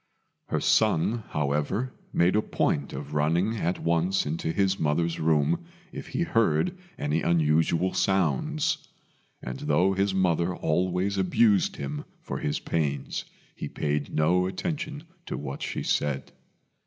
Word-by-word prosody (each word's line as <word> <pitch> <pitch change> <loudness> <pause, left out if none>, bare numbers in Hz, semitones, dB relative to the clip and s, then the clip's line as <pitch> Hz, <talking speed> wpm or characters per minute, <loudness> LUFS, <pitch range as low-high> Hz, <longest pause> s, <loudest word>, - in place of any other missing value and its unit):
Her - - 0
son, 110 +7 +2
however, 75 - -1 0.2
made 90 +3 +3
a 105 - +4
point 70 -8 0
of - - -7
running 85 +9 +1
at 90 -2 0
once 85 +3 +1
into 80 +2 -2
his 95 +2 +1
mother's 80 +2 0
room 80 - +2 0.3
if - - -7
he 170 - -1
heard 115 - +2 0.2
any 75 +3 0
unusual 80 +2 +2
sounds; 100 - +1 0.6
and - - -5
though 95 -10 +2
his 100 +1 +1
mother 90 -1 +2
always 90 +4 0
abused 100 +2 +3
him 70 +1 -5
for - - -5
his 75 - -1
pains, 70 -4 -2 0.3
he - - -5
paid 75 -1 -2
no 90 +4 +2
attention 150 - -4 0.2
to - - -3
what 70 -1 -6
she - - -3
said. 70 -2 -1
85 Hz, 135 wpm, -27 LUFS, 75-100 Hz, 0.6 s, a